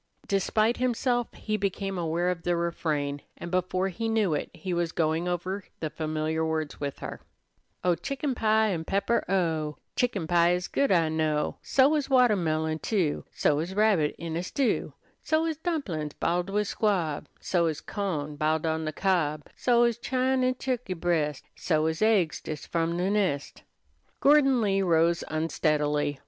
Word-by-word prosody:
Despite 215 +4 +1
himself, 245 -1 0
he 215 0 -2
became 195 -1 -2
aware 170 0 0
of 180 -2 -2
the 175 +1 0
refrain, 155 -4 -1 0.2
and 170 - -7
before 185 +1 0
he 225 +5 -3
knew 215 -7 +2
it 150 - -2
he 185 -2 -5
was 170 -1 0
going 160 +1 0
over 180 +3 -3
the 155 -2 -3
familiar 155 0 -2
words 160 -2 -2
with 140 -1 -4
her: - - -7 0.6
"Oh, 180 - +4
chicken 275 - -3
pie 220 -2 +2
an 170 -5 -2
'pepper, 200 +7 +1
oh! 160 -5 0 0.2
Chicken 215 -9 0
pie 170 +1 +4
is 180 0 -2
good, 280 -4 +1
I 165 -4 +3
know; 155 -1 0
So 275 +3 +4
is 300 -3 0
wattehmillion, 165 - +2
too; 185 -9 0
So 145 -1 +1
is 175 +4 -4
rabbit 200 -8 +3
in 165 -1 -5
a 170 - -1
stew; 250 +8 -1 0.3
So 315 +1 +1
is 320 -2 -2
dumplin's, 250 - -3
b'iled 175 +2 0
with 210 +1 0
squab; 180 -10 0
So 170 -2 +1
is 155 -2 -2
cawn, 155 -7 -3
b'iled 155 +1 +1
on 160 0 -1
de 155 - -1
cob; 155 -5 0
So 240 -1 +3
is 235 -1 +1
chine 260 +1 +1
an' 255 0 +2
turkey 250 -7 -3
breast; 160 -4 -1
So 155 -2 +1
is 160 0 -1
aigs 210 -7 +2
des 155 - -4
f'om 165 +3 -2
de 185 +3 0
nest." 185 -9 -1 0.6
Gordon 275 -3 +5
Lee 195 -2 +2
rose 170 -2 +3
unsteadily. 150 -2 0
175 Hz, 170 wpm, -27 LUFS, 160-215 Hz, 0.6 s, Gordon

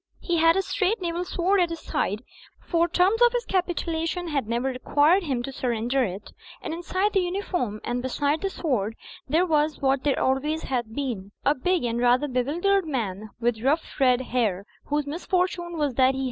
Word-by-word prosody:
He 345 -2 -1
had 330 +1 +5
a 385 - +1
straight 400 +3 0
naval 345 -1 -2
sword 365 +2 +1
at 345 - +2
his 335 -1 -6
side; 210 +5 -2 0.4
for 340 -1 +1
e - - -25
terms 380 +6 +3
of 480 0 +6
his 485 0 -1
capitulation 345 -1 -1
had 275 -7 -1
never 240 +3 0
required 290 +7 +3
him 265 -8 -2
to 270 - -5
surrender 245 +1 0
it; 195 -1 -5 0.3
and - - -5
inside 370 +4 -1
the 390 - +4
uniform 355 - -2
and 245 +1 -2
beside 285 +4 0
the 390 - 0
sword 230 - -1 0.3
there 330 +6 +3
was 305 -2 +1
what 270 -1 +1
there 285 -2 +1
always 295 +5 0
had 240 -4 -3
been, 225 -8 -4
a 285 - +5
big 355 +4 0
and 235 -1 -1
rather 245 +4 +3
bewildered 325 +9 +1
man 215 -7 -3
with 235 -2 0
rough 295 +7 0
red 255 -2 +4
hair, 220 -7 -1 0.2
whose 295 0 -1
misfortune 345 +2 -1
was 295 -4 0
that 260 +1 +3
he! - - -3
295 Hz, 190 wpm, -25 LUFS, 250-350 Hz, 0.4 s, of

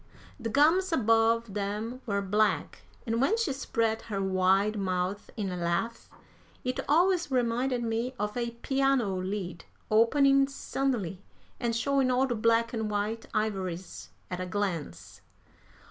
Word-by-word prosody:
The 230 -2 -3
gums 330 - +4
above 230 -4 +2
them 210 +5 -3
were 200 -1 0
black, 210 +2 0 0.2
and 230 0 0
when 380 +12 +3
she 385 -12 0
spread 230 -4 -1
her 205 -3 -4
wide 190 +2 +2
mouth 185 0 -2
in 200 -3 -2
a - - -3
laugh, 175 +7 -2 0.5
it 255 0 -2
always 350 +2 +3
reminded 250 0 0
me 230 +3 -2
of 210 -1 -3
a 240 -1 -1
piano 270 -7 +2
lid 185 -2 -4 0.3
opening 275 +5 +5
suddenly 245 -9 -2 0.4
and 235 -2 -1
showing 270 +2 +2
all 255 +1 +3
the 255 - -1
black 230 +1 +2
and 220 -2 -2
white 210 +2 -2
ivories 190 -4 -3 0.2
at 180 - -3
a 185 - -3
glance. 145 - -4
225 Hz, 140 wpm, -29 LUFS, 195-255 Hz, 0.5 s, opening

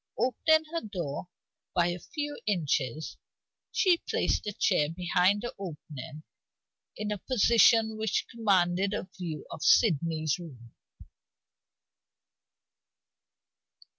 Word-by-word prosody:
Opening 285 +7 +3
her 335 - -1
door 175 -7 -5 0.5
by 175 0 +3
a 175 +1 -3
few 290 - -5
inches, 155 - -1 0.5
she 360 -3 +3
placed - - 0
a - - -1
chair 150 -5 +2
behind 180 +4 +1
the 240 - -4
opening 150 -5 -8 0.7
in 210 0 -3
a 205 - -3
position 225 -1 +4
which 220 -3 0
commanded 195 -3 +1
a 185 - -4
view 165 -5 -6
of 155 - -8
Sydney's 160 - +3
room. 125 -9 -12
185 Hz, 105 wpm, -29 LUFS, 160-220 Hz, 0.7 s, position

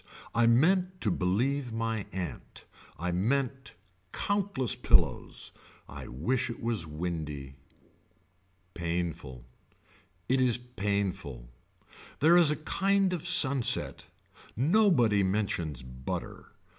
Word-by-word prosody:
I 115 0 +4
meant 180 +9 +3
to 105 - +1
believe 120 +9 0
my 115 -2 -2
aunt. 85 -9 -6 0.3
I 90 +1 -2
mean 120 +9 +1 0.6
countless 200 - 0
pillows. - - +1 0.4
I - - -8
wish 120 - -1
it 115 - -6
was 115 -8 -1
windy. 75 -4 -4 1.2
Painful. 85 -7 -4 0.8
It 130 +1 +2
is 125 -2 +3
painful. 100 - -3 0.7
There 160 +4 +6
is 175 -4 +6
a 150 - +2
kind 195 +4 +1
of 175 -1 -3
sunset, 140 -8 +2 0.5
nobody 135 - +4
mentions 95 - -1
butter. 65 0 -6
115 Hz, 100 wpm, -29 LUFS, 85-140 Hz, 1.2 s, There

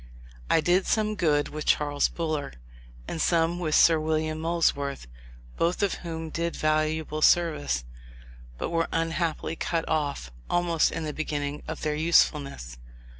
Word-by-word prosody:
I 160 - +4
did 180 +3 +2
some 215 -1 +1
good 150 -7 +1
with 155 0 -6
Charles 145 -1 +2
Buller, 155 -4 -3 0.5
and 160 - -3
some 170 +1 +2
with 155 -3 0
Sir 165 -1 +6
William 155 0 -1
Molesworth; 160 -4 0 0.5
both 175 +4 +1
of 200 - +1
whom 160 -2 -5
did 170 +1 -2
valuable 155 0 0
service, 70 - +2 0.7
but - - -3
were 165 -1 +1
unhappily 165 0 -1
cut 165 0 -2
off 140 - -2 0.2
almost 175 -2 +2
in - - -4
the 150 -1 -3
beginning 145 -2 -3
of 160 - -6
their 150 - 0
usefulness. 145 - +1
160 Hz, 140 wpm, -27 LUFS, 150-170 Hz, 0.7 s, Sir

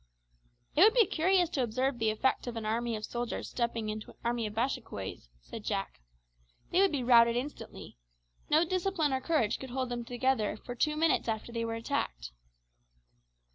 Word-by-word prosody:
"It 310 - +4
would 435 +5 +7
be 470 -3 +6
curious 360 +2 +2
to 275 - 0
observe 255 +2 0
the 220 -1 +2
effect 235 +4 0
of 240 - -4
an 225 -1 -4
army 230 +1 -1
of 215 0 -4
soldiers 240 0 -4
stepping 235 -2 -1
into 215 0 -5
an - - -15
army 235 -2 0
of 210 - -8
Bashikouays," 225 - -3
said - - -9
Jack. - - -3 0.7
"They 365 - +4
would 390 - +4
be 280 -4 -1
routed 235 -1 +6
instantly. 255 - -6 0.5
No 315 +3 +4
discipline 360 -4 0
or 260 - 0
courage 260 -9 +1
could 265 - -7
hold 255 0 -2
them 240 -1 -3
together 245 -3 0
for 245 - -7
two 300 +5 0
minutes 320 -4 +2
after 220 +1 -3
they 230 -1 -2
were 225 0 -3
attacked." - - -3
240 Hz, 180 wpm, -31 LUFS, 225-295 Hz, 0.7 s, would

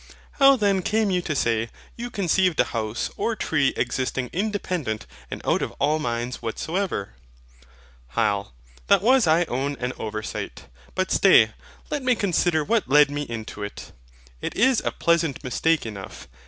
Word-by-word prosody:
How 275 0 +8
then 200 -5 +2
came 215 +2 +1
you 180 -1 +1
to 155 -3 -3
say, 115 -3 +1 0.3
you 240 +1 -5
conceived 185 -5 +1
a - - +7
house 110 0 -2
or 230 - 0
tree 145 -9 +1
existing 125 0 -1
independent 180 - -2 0.2
and - - -6
out - - +2
of - - -3
all 150 +3 +1
minds 120 -2 -3
whatsoever? 140 - -3 1.0
HYL. 100 -3 +1 0.4
That 200 -1 +4
was 255 -2 +5
I 160 +2 +4
own 140 -1 -2
an 125 +1 -2
oversight; 110 0 -5 0.3
but 185 0 -1
stay, 115 - +6 0.4
let 295 - -1
me 255 -1 +2
consider 175 -5 +1
what 220 - 0
led 145 +1 +6
me 145 0 -2
into 110 -2 -6
it. 100 0 -7 0.5
It - - -4
is 255 +1 +3
a - - +1
pleasant 170 -4 +1
mistake 160 +4 +1
enough. 100 -4 -8
155 Hz, 155 wpm, -24 LUFS, 120-195 Hz, 1.0 s, How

